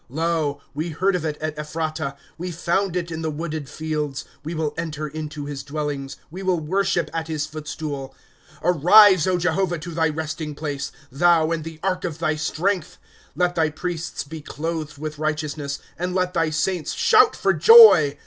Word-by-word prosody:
* -, -, -39 dB
Lo, 160 Hz, -4 st, 0 dB
we 155 Hz, +4 st, -3 dB
heard 185 Hz, +5 st, +1 dB
of 175 Hz, -, -2 dB
it 155 Hz, -2 st, -2 dB
at 155 Hz, -1 st, -3 dB
Ephratah; 155 Hz, -2 st, -3 dB, 0.2 s
We 180 Hz, +2 st, -5 dB
found 175 Hz, +2 st, -1 dB
it 175 Hz, -1 st, -2 dB
in 160 Hz, 0 st, -4 dB
the 160 Hz, -, -1 dB
wooded 155 Hz, -2 st, -5 dB
fields. 150 Hz, -2 st, -3 dB
' -, -, -32 dB
We 160 Hz, +3 st, -5 dB
will 155 Hz, -2 st, -1 dB
enter 155 Hz, -2 st, -4 dB
in 155 Hz, +1 st, -6 dB
to 150 Hz, -1 st, -7 dB
his 145 Hz, -1 st, -5 dB
dwellings. 145 Hz, -1 st, -4 dB
We 185 Hz, +3 st, -7 dB
will 185 Hz, -3 st, +1 dB
worship 185 Hz, +2 st, 0 dB
at 165 Hz, -1 st, -3 dB
his 155 Hz, -2 st, -2 dB
footstool. 150 Hz, -3 st, -6 dB, 0.4 s
^ -, -, -23 dB
Arise, 180 Hz, +2 st, +6 dB
Jehovah, 180 Hz, 0 st, +1 dB
to 170 Hz, +2 st, -7 dB
thy 160 Hz, -1 st, +1 dB
resting 155 Hz, 0 st, -4 dB
place, 145 Hz, -2 st, -4 dB, 0.2 s
Thou, 165 Hz, +2 st, +3 dB
and 165 Hz, -2 st, -1 dB
the 160 Hz, 0 st, -9 dB
ark 185 Hz, -2 st, -1 dB
of 165 Hz, -4 st, -3 dB
thy 160 Hz, -2 st, 0 dB
strength. 175 Hz, +4 st, -1 dB, 0.3 s
^ -, -, -31 dB
Let 180 Hz, +2 st, +1 dB
thy 160 Hz, -2 st, +1 dB
priests 170 Hz, +2 st, -4 dB
be 155 Hz, +2 st, -9 dB
clothed 155 Hz, 0 st, -5 dB
with 150 Hz, 0 st, -6 dB
righteousness, 150 Hz, -2 st, -2 dB, 0.2 s
And 180 Hz, +1 st, -2 dB
let 180 Hz, -1 st, 0 dB
thy 165 Hz, -2 st, +1 dB
saints 160 Hz, +2 st, -1 dB
shout 440 Hz, -1 st, +5 dB
for -, -, +2 dB
joy. 440 Hz, -, +8 dB
160 Hz, 190 wpm, -23 LUFS, 150-175 Hz, 0.4 s, joy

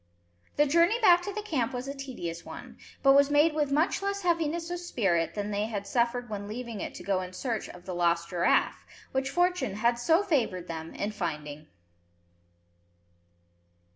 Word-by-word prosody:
The 295 Hz, -, +4 dB
journey 340 Hz, +10 st, +3 dB
back 355 Hz, -6 st, +6 dB
to 405 Hz, -, -4 dB
the 425 Hz, +1 st, -5 dB
camp 270 Hz, -, -1 dB
was 250 Hz, +2 st, -4 dB
a 275 Hz, -, -3 dB
tedious 240 Hz, -12 st, -6 dB
one, -, -, -10 dB, 0.2 s
but 275 Hz, -1 st, +7 dB
was 280 Hz, 0 st, +5 dB
made 295 Hz, +2 st, +4 dB
with 295 Hz, -2 st, 0 dB
much 310 Hz, +7 st, +2 dB
less 400 Hz, 0 st, -2 dB
heaviness 335 Hz, -1 st, 0 dB
of 350 Hz, -, -3 dB
spirit 185 Hz, -, 0 dB
than 205 Hz, 0 st, -3 dB
they 205 Hz, +1 st, -1 dB
had 205 Hz, -3 st, -4 dB
suffered 240 Hz, +3 st, 0 dB
when 205 Hz, -2 st, -5 dB
leaving 230 Hz, -1 st, -6 dB
it -, -, -5 dB
to -, -, -8 dB
go 190 Hz, 0 st, 0 dB
in 185 Hz, 0 st, -7 dB
search 225 Hz, +2 st, -3 dB
of 180 Hz, 0 st, -12 dB
the 185 Hz, -, -5 dB
lost 170 Hz, -1 st, +1 dB
giraffe, 175 Hz, -1 st, +2 dB, 0.3 s
which 265 Hz, 0 st, -1 dB
fortune 350 Hz, -, +1 dB
had 235 Hz, +3 st, +1 dB
so 325 Hz, +9 st, +3 dB
favoured 230 Hz, -, 0 dB
them 160 Hz, -1 st, -6 dB
in 205 Hz, -, -2 dB
finding. 150 Hz, -6 st, -5 dB
245 Hz, 180 wpm, -28 LUFS, -, 0.3 s, but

